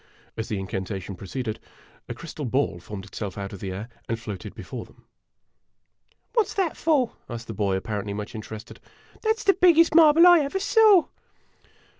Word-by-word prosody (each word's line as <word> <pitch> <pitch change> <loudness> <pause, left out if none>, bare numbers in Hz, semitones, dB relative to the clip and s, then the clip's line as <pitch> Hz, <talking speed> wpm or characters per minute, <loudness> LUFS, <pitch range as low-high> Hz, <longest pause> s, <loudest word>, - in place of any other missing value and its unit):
As 110 0 -4
the 105 - -2
incantation 95 0 -5
proceeded, 110 +4 -5 0.5
a - - -4
crystal 155 -2 -8
ball 130 -7 0
formed 95 +2 -8
it 105 - -17
self 100 -3 -5
out 100 0 -5
of 100 - -8
the 95 0 -5
air 100 +4 -6 0.2
and 115 0 -1
floated 105 -5 -7
before - - -7
them. - - -21 1.3
"What 455 -4 +3
's - - -8
that 375 -5 0
for?" 290 -7 +2 0.2
asked 115 -1 -6
the 115 - -6
boy, 100 -2 0
apparently 100 +1 -3
much 105 0 -6
interested. 110 0 -9 0.2
" - - -26
That 440 0 +1
's 445 - -8
the 390 - +5
biggest 335 -3 +5
marble 325 +1 +7
I 350 -1 +8
ever 295 +6 -1
saw 415 -3 +5
115 Hz, 185 wpm, -25 LUFS, -, 1.3 s, I